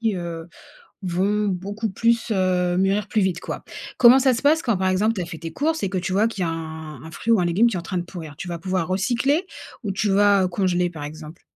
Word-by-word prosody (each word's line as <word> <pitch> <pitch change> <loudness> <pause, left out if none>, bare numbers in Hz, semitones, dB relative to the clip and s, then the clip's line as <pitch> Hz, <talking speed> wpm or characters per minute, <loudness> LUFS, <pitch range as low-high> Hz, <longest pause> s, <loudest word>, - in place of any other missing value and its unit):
qui, 225 -3 +1
heu, 170 -1 -6 0.5
vont 195 +4 0
beaucoup 200 +4 -3
plus, 230 +3 +1
heu 180 -2 +1
mûrir 195 +2 +1
plus 215 - +1
vite, 180 -2 0
quoi. - - -6 0.3
Comment 250 +2 +8
ça 260 -1 +3
se - - -4
passe 310 +3 +4
quand, 235 -5 +1
par 190 0 0
exemple, 205 +4 +2
t'as 180 -5 -3
fait 170 -1 -8
tes 165 +1 -7
courses 320 - -1
et 195 - 0
que 190 - -4
tu 185 +1 -3
vois 205 +3 +3
qu'il 205 -4 -5
y - - +2
a 165 - -1
un 160 -1 -7
un 160 - -9
fruit 230 +8 -1
ou 220 - +4
un - - +1
légume 190 +7 +3
qui 215 - -3
est - - -1
en - - -5
train 180 +2 -3
de 175 - -1
pourrir? 165 -5 -9
Tu 180 - -7
vas 170 -1 -4
pouvoir 185 -1 -1
recycler? 245 - +1 0.4
Ou 200 - -1
tu 205 +2 0
vas, 200 0 +4
heu, - - +1
congeler, 180 -1 0
par 150 -4 -8
exemple? 155 +2 -9
190 Hz, 265 wpm, -23 LUFS, 175-215 Hz, 0.5 s, Comment